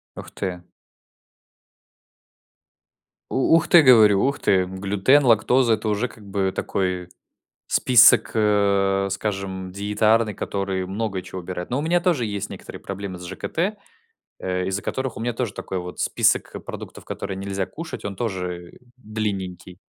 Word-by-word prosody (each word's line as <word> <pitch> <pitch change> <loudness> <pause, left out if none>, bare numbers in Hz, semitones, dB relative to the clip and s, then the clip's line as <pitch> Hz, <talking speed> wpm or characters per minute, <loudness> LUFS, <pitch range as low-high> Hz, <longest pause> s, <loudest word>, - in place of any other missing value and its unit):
Ух - - -9
ты. 90 -3 -5 2.6
У 135 +5 +3
ух 165 0 +2
ты, 175 - +8
говорю, 110 -7 +6
ух 140 +1 0
ты, 95 -2 +3
глютен, 100 +9 +2
лактоза- 120 +1 +4
это 110 0 -1
уже 105 +4 0
как 110 - -16
бы 95 -1 -1
такой 90 -2 -2 0.6
список, 120 -3 +6
э, 100 -2 +2
скажем, 95 -2 -3
диетарный, 105 +3 +1
которые 95 -2 -3
много 100 -1 -3
чего 95 0 -7
убирают. 90 0 -6
Ну, 125 - 0
у - - -1
меня 175 +3 +2
тоже 170 -9 +1
есть 100 -1 -4
некоторые - - -9
проблемы 100 -1 -6
с 90 - -9
ЖКТ, 170 - -2 0.6
э, 90 0 -2
из-за 95 +1 -2
которых 130 +2 -3
у - - -6
меня 120 +1 -2
тоже 115 -3 -2
такой 95 - -5
вот 90 0 -7
список - - +1
продуктов, - - -9
которые 95 -1 -5
нельзя 95 0 -3
кушать, 160 - -8
он 100 -1 -5
тоже, 90 -5 -4
э, - - -18 0.2
длинненький. 95 -6 -5
100 Hz, 150 wpm, -23 LUFS, 95-115 Hz, 2.6 s, ты